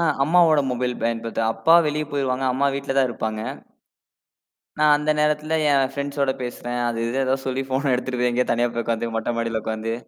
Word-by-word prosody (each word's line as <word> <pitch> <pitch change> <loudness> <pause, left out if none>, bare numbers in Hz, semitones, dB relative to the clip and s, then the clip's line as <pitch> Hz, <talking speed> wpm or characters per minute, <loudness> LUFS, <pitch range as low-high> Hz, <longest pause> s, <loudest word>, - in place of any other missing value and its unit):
அ, - - +1 0.2
அம்மாவோட 160 -2 +4
மொபைல் 125 0 -1
பயன்படுத்துவேன். 115 -1 -1
அப்பா 165 +1 +4
வெளிய 150 +1 -1
போயிருவாங்க. 135 -2 -1
அம்மா 140 +2 +1
வீட்டுலதான் 135 -1 0
இருப்பாங்க. 110 -1 -4 1.4
நான் 150 -1 +5
அந்த 150 +1 +1
நேரத்துல, 150 +1 +1
என் 135 -1 +2
ஃபிரண்ட்ஸ்ஸோட 140 -1 -1
பேசுறன். 120 0 -4
அது 115 -1 -3
இது 130 +3 -1
எதாது 135 +1 -1
சொல்லி 130 +1 -1
ஃபோன் 135 +1 0
எடுத்துட்டுபோய் 125 -1 0
எங்கேயாது 125 +1 0
தனியா 120 +1 +1
போய் 115 - -2
உக்காந்து 115 0 -2
மொட்ட 115 +2 -2
மாடியில 115 -1 -2
உக்காந்து. 110 +1 -3
130 Hz, 175 wpm, -22 LUFS, 115-140 Hz, 1.4 s, நான்